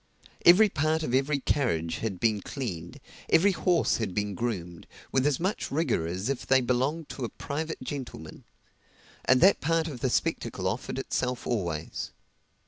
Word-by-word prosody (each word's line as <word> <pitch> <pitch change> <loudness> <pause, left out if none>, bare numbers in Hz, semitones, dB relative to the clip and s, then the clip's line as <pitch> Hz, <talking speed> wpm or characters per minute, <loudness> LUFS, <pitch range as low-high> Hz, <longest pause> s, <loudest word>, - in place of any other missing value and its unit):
Every 190 +6 +9
part 160 -2 0
of 125 - -2
every 135 +3 +2
carriage 85 - 0
had 100 -5 -3
been 110 -2 +2
cleaned, 90 - -5 0.3
every 195 +5 +5
horse 175 -2 +2
had 105 -5 -3
been 105 -1 -1
groomed, 90 -6 -4 0.2
with 135 +1 +2
as 145 -3 +1
much 190 +5 -1
rigor 140 - 0
as 90 +5 -3
if 135 -2 -2
they 135 0 +5
belonged 130 +6 0
to 135 - -6
a 115 - -2
private 160 +3 -5
gentleman; 120 - -7 0.8
and 130 0 +4
that 195 - +6
part 165 +1 +1
of 140 -6 -6
the 130 - 0
spectacle 115 - -1
offered 105 +7 -3
itself 125 -2 -2
always. 85 -10 -2
130 Hz, 160 wpm, -28 LUFS, 100-155 Hz, 0.8 s, Every